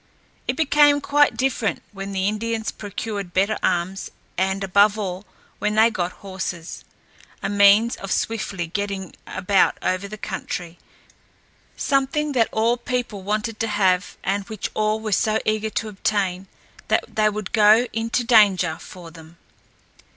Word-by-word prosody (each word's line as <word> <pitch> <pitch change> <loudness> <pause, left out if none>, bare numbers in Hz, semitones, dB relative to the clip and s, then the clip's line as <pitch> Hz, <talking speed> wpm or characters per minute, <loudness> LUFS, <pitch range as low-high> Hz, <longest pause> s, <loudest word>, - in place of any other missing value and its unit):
It - - 0
became 295 -1 +5
quite 290 +1 +3
different 255 -5 -1
when 195 -1 -6
the 190 0 0
Indians 220 +1 -2
procured 205 -2 -6
better 200 +3 +2
arms 185 +2 -1 0.3
and, 190 +2 0
above 200 +2 +4
all, 190 -1 -4 0.3
when 210 0 0
they 220 +2 +5
got 180 -4 -2
horses 185 -3 -5 0.6
a 195 - -1
means 205 +3 +5
of 195 - -7
swiftly 210 -5 -1
getting 195 +1 -4
about 195 +1 +2
over 185 +2 -1
the 215 +1 -8
country, 180 -4 -5 1.0
something 280 +2 0
that 240 -5 +2
all 230 +2 +2
people 240 -4 -3
wanted 215 +3 -2
to 225 - 0
have 190 -3 +1
and 200 +1 0
which 215 -3 -4
all 215 0 0
were 220 -1 -4
so 215 +2 +2
eager 215 0 0
to 220 0 -3
obtain 195 -2 -1 0.4
that - - +2
they 215 -1 +3
would 210 -2 -5
go 215 +2 +6
into 230 +2 -1
danger 195 -8 +4
for 175 -3 -11
them. 165 0 -15
210 Hz, 145 wpm, -22 LUFS, 190-225 Hz, 1.0 s, go